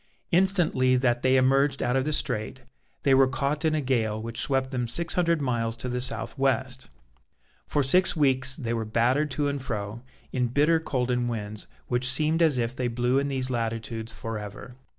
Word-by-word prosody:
Instantly 175 Hz, -8 st, +3 dB
that 120 Hz, -1 st, +1 dB
they 130 Hz, 0 st, +3 dB
emerged 135 Hz, +2 st, +2 dB
out 125 Hz, -, 0 dB
of 135 Hz, 0 st, +1 dB
the 155 Hz, -, -1 dB
Strait, 110 Hz, -7 st, -3 dB, 0.4 s
they 135 Hz, -, +4 dB
were 135 Hz, 0 st, +6 dB
caught 140 Hz, +3 st, -2 dB
in 155 Hz, -1 st, +2 dB
a 155 Hz, -, 0 dB
gale 115 Hz, -5 st, 0 dB
which 115 Hz, +1 st, -5 dB
swept 135 Hz, -1 st, 0 dB
them 125 Hz, -2 st, -2 dB
six 170 Hz, +8 st, 0 dB
hundred 170 Hz, -4 st, +1 dB
miles 115 Hz, -3 st, -1 dB
to 125 Hz, -, -6 dB
the 125 Hz, 0 st, -2 dB
south 130 Hz, +2 st, -2 dB
west. 130 Hz, -1 st, 0 dB, 0.8 s
For 145 Hz, -, +1 dB
six 180 Hz, +9 st, +4 dB
weeks 130 Hz, -4 st, +2 dB
they 120 Hz, -6 st, -3 dB
were 115 Hz, -1 st, -1 dB
battered 120 Hz, +7 st, +1 dB
to 145 Hz, -1 st, -1 dB
and 140 Hz, -1 st, -2 dB
fro, 110 Hz, -3 st, -5 dB, 0.3 s
in 125 Hz, -2 st, +1 dB
bitter 150 Hz, +6 st, +3 dB
cold 130 Hz, -5 st, -2 dB
and 120 Hz, -1 st, 0 dB
winds 105 Hz, -2 st, -5 dB, 0.2 s
which 125 Hz, +1 st, 0 dB
seemed 155 Hz, +5 st, +1 dB
as 155 Hz, -5 st, +3 dB
if 120 Hz, +1 st, -1 dB
they 125 Hz, -1 st, -1 dB
blew 125 Hz, +2 st, +1 dB
in 140 Hz, -, -1 dB
these 130 Hz, -2 st, -2 dB
latitudes 115 Hz, -1 st, -3 dB
for 115 Hz, -1 st, -5 dB
ever. 105 Hz, +4 st, -9 dB
130 Hz, 195 wpm, -26 LUFS, 120-140 Hz, 0.8 s, were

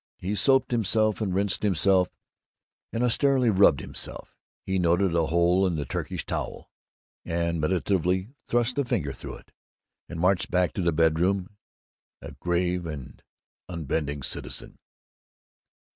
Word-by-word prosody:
He 95 Hz, +3 st, -3 dB
soaped 130 Hz, +5 st, +3 dB
himself, 110 Hz, -1 st, +1 dB
and 100 Hz, -3 st, 0 dB
rinsed 100 Hz, +1 st, 0 dB
himself, 95 Hz, -1 st, +3 dB, 0.8 s
and 115 Hz, -, -1 dB
austerely 130 Hz, 0 st, +3 dB
rubbed 95 Hz, -8 st, +5 dB
himself; -, -, -7 dB, 0.3 s
he 95 Hz, 0 st, -1 dB
noted 90 Hz, +1 st, +2 dB
a 85 Hz, -2 st, +2 dB
hole 85 Hz, +3 st, +3 dB
in 90 Hz, -, -1 dB
the 75 Hz, -2 st, -3 dB
Turkish -, -, -4 dB
towel, -, -, -5 dB, 0.5 s
and 85 Hz, -1 st, -1 dB
meditatively 95 Hz, +3 st, 0 dB, 0.2 s
thrust 120 Hz, +2 st, +1 dB
a -, -, +3 dB
finger 75 Hz, -, -1 dB
through -, -, -8 dB
it, -, -, -17 dB, 0.6 s
and 85 Hz, -, -6 dB
marched 90 Hz, +2 st, +2 dB
back 90 Hz, -2 st, +1 dB
to -, -, -2 dB
the 85 Hz, -1 st, +2 dB
bedroom, 85 Hz, +5 st, +1 dB, 0.6 s
a -, -, -9 dB
grave 90 Hz, 0 st, -1 dB
and 75 Hz, -5 st, -8 dB, 0.5 s
unbending 75 Hz, -4 st, -3 dB
citizen. -, -, -5 dB
90 Hz, 135 wpm, -26 LUFS, 85-100 Hz, 0.8 s, rubbed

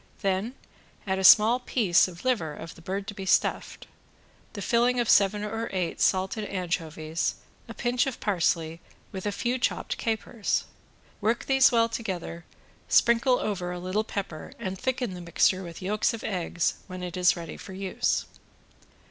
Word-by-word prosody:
Then 195 Hz, +6 st, 0 dB, 0.5 s
add 190 Hz, -1 st, -1 dB
a -, -, -2 dB
small 220 Hz, +5 st, +7 dB
piece 205 Hz, -9 st, +3 dB
of 175 Hz, +3 st, -11 dB
liver 170 Hz, -13 st, 0 dB
of 165 Hz, +2 st, -9 dB
the -, -, -16 dB
bird 195 Hz, +4 st, -4 dB
to 205 Hz, -, -6 dB
be 195 Hz, -1 st, -7 dB
stuffed. -, -, +1 dB, 0.7 s
The 205 Hz, -, -6 dB
filling 245 Hz, +1 st, +2 dB
of 240 Hz, -, +1 dB
seven 205 Hz, 0 st, +4 dB
or 225 Hz, +2 st, -3 dB
eight 180 Hz, -3 st, -2 dB
salted 190 Hz, +3 st, +1 dB
anchovies, 165 Hz, -4 st, -2 dB, 0.3 s
a 230 Hz, -, -7 dB
pinch 245 Hz, +2 st, +1 dB
of 265 Hz, -, -4 dB
parsley, 165 Hz, -4 st, 0 dB, 0.3 s
with 190 Hz, 0 st, -5 dB
a -, -, 0 dB
few 240 Hz, +5 st, -1 dB
chopped 255 Hz, -, -1 dB
capers. 220 Hz, -1 st, -1 dB, 0.6 s
Work 225 Hz, +3 st, 0 dB
these 270 Hz, -1 st, +5 dB
well 230 Hz, -1 st, +4 dB
together, 185 Hz, -7 st, -5 dB, 0.4 s
sprinkle 235 Hz, +2 st, +4 dB
over 185 Hz, -4 st, -3 dB
a 180 Hz, -, -4 dB
little 185 Hz, +4 st, -1 dB
pepper 195 Hz, -7 st, -6 dB
and 190 Hz, -5 st, -4 dB
thicken 250 Hz, 0 st, -2 dB
the 180 Hz, -, -7 dB
mixture 175 Hz, +2 st, +2 dB
with 170 Hz, 0 st, -9 dB
yolks 210 Hz, +4 st, +1 dB
of 225 Hz, -, -10 dB
eggs, 175 Hz, -3 st, -1 dB
when 185 Hz, -1 st, -7 dB
it 175 Hz, 0 st, -5 dB
is 180 Hz, -1 st, +4 dB
ready 170 Hz, -2 st, -7 dB
for 190 Hz, -, -10 dB
use. 190 Hz, 0 st, -1 dB
195 Hz, 165 wpm, -27 LUFS, 180-230 Hz, 0.7 s, small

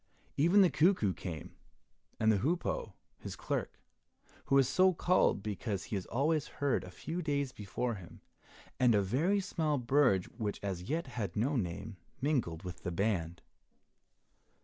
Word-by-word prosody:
Even 175 Hz, +8 st, +5 dB
the 185 Hz, -, +5 dB
cuckoo 155 Hz, -, +3 dB
came, 85 Hz, -4 st, -7 dB, 0.7 s
and 110 Hz, 0 st, +4 dB
the 105 Hz, -, +2 dB
hoopoe, 165 Hz, -, -1 dB, 0.3 s
his -, -, -7 dB
clerk, -, -, -3 dB, 0.7 s
who 140 Hz, -, +3 dB
is 135 Hz, -2 st, +5 dB
so 185 Hz, +6 st, +4 dB
called 175 Hz, -, +2 dB
because 105 Hz, -2 st, -3 dB
he 105 Hz, -, -4 dB
is 95 Hz, -, -3 dB
always 150 Hz, +4 st, +1 dB
heard 140 Hz, -3 st, +1 dB
a 90 Hz, -, -9 dB
few 165 Hz, -, -5 dB
days 140 Hz, -4 st, -1 dB
before 115 Hz, +4 st, -3 dB
him, 95 Hz, -5 st, -10 dB, 0.6 s
and 125 Hz, -3 st, +5 dB
a 100 Hz, -, +3 dB
very 160 Hz, -, +2 dB
small 160 Hz, -6 st, 0 dB
bird 125 Hz, -6 st, +3 dB
which 105 Hz, -2 st, -2 dB
as 95 Hz, -3 st, -3 dB
yet 165 Hz, +2 st, 0 dB
had 115 Hz, -8 st, -4 dB
no 130 Hz, +8 st, +1 dB
name, 100 Hz, -1 st, -3 dB, 0.2 s
mingled 130 Hz, -, 0 dB
with 90 Hz, -1 st, -7 dB
the 90 Hz, -, -3 dB
band. 85 Hz, -3 st, -1 dB
120 Hz, 155 wpm, -33 LUFS, 95-150 Hz, 0.7 s, Even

